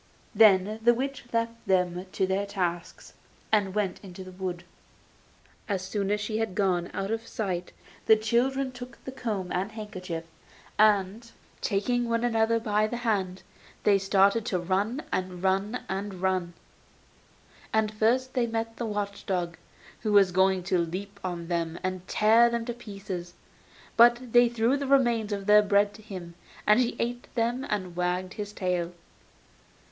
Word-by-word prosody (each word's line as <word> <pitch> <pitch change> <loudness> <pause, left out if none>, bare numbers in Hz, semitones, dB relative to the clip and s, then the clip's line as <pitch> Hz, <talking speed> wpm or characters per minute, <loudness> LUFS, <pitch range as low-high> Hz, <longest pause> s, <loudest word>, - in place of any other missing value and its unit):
Then 210 -1 +5
the 240 +1 +5
witch 270 +1 -4
left 230 0 -2
them 180 -1 +1
to 190 - +1
their 195 +2 -1
tasks, 175 -4 -4 0.4
and 205 -3 +2
went 200 -4 -1
out - - -28
into 190 -1 -9
the 185 - -10
wood. 180 -1 -5 1.1
As 190 -2 -1
soon 195 +1 -2
as 210 0 +1
she 215 +1 -2
had 225 -5 -2
gone 180 -4 +1
out 195 +2 -3
of 225 0 -3
sight 180 -5 -3 0.4
the 220 - +8
children 255 +5 +1
took 245 -1 -10
the 265 - -5
comb 210 -8 -3
and 190 +3 -1
the - - -17
handkerchief, 185 -6 -6 0.6
and, 215 +2 +3 0.3
taking 240 +4 0
one 230 0 +1
another 230 -1 +2
by 215 -1 +1
the 240 - -4
hand, 190 -4 -1 0.4
they 200 -2 +4
started 200 +4 +3
and 175 -2 -2
ran, 210 +9 0
and 185 -1 -3
ran, 195 +5 0
and 195 +1 -4
ran. 185 -2 0 1.2
And 220 -1 +1
first 245 +5 +1
they 245 -3 +1
met 225 0 -3
the 235 - -3
watch 205 -1 -4
dog, 175 -3 -1 0.4
who 215 - -2
was 195 -2 +6
going 190 0 +3
to 185 0 +1
leap 185 +4 -4
on 175 -2 -4
them 170 -1 -2
and 185 0 -3
tear 225 +3 +5
them 235 -1 -2
to 240 - -3
pieces; 195 -6 -7 0.6
but 240 +1 +5
they 240 0 +6
threw 235 +3 +1
the 280 -1 -3
remains 240 -6 +3
of 200 -1 -3
their 210 +1 +7
bread 205 0 +2
to 215 - -13
him, 185 -5 -8 0.3
and 210 +2 +5
he 245 -1 +1
ate 240 +1 -3
them 240 +2 0
and 185 -4 -3
wagged 180 +1 -1
his 205 -1 -5
tail. 180 -3 -2
205 Hz, 165 wpm, -27 LUFS, 185-230 Hz, 1.2 s, the